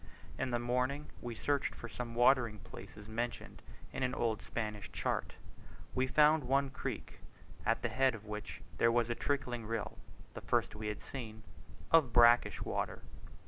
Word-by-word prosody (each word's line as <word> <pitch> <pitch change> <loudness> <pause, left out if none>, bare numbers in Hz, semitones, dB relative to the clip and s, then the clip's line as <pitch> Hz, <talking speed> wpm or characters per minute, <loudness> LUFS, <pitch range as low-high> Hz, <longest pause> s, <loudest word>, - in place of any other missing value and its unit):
In 135 0 0
the 120 - +1
morning 125 +4 -1
we 120 -1 -5
searched 140 +4 0
for 120 - -7
some 120 0 -6
watering 120 -3 +4
places 100 +1 -11
mentioned 120 +2 -4 0.3
in - - -4
an 130 0 +1
old 110 -2 0
Spanish 105 -4 -4
chart. - - -2 0.6
We 130 0 +1
found 150 +3 +5
one 135 +2 +2
creek, - - -5 0.5
at - - +2
the - - +1
head 130 -2 +3
of 105 -1 -11
which 105 -1 -6 0.2
there 115 - +5
was 120 0 +2
a - - +3
trickling 125 -3 -1
rill 110 -1 -3 0.3
(the - - -7
first - - +1
we 110 0 -5
had 105 -1 -4
seen) 110 -5 -7 0.5
of 155 -8 +5
brackish 120 0 +6
water. - - -2
120 Hz, 165 wpm, -34 LUFS, 110-130 Hz, 0.6 s, brackish